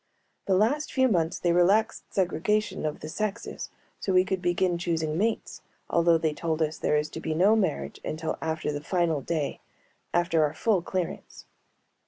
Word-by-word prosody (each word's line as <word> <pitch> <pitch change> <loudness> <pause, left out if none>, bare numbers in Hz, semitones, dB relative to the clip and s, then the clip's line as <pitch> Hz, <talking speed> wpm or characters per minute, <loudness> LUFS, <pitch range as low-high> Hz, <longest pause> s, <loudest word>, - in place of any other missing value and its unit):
The 190 - +3
last 255 +10 +1
few 260 -1 +3
months 170 -7 +1
they 175 -1 +1
relaxed 195 +6 +2
segregation 195 0 0
of 150 - -5
the 155 - -6
sexes 210 +5 -4 0.3
so 190 - -1
we 185 0 +5
could 190 -1 -2
begin 175 0 +1
choosing 160 -3 -1
mates, 220 +6 -1 0.3
although 170 -1 +4
they 160 -1 0
told 160 0 -2
us 155 0 -3
there 150 - +2
is 150 0 0
to - - -6
be 160 -1 -2
no 195 +7 +5
marriage 185 -9 -1
until 160 +1 -3
after 160 -1 -2
the 145 0 -4
final 170 -3 0
day, 155 0 -2 0.5
after 170 -2 +2
our 150 - 0
full 210 -6 +2
clearance. 180 0 -4
175 Hz, 175 wpm, -27 LUFS, 160-190 Hz, 0.5 s, we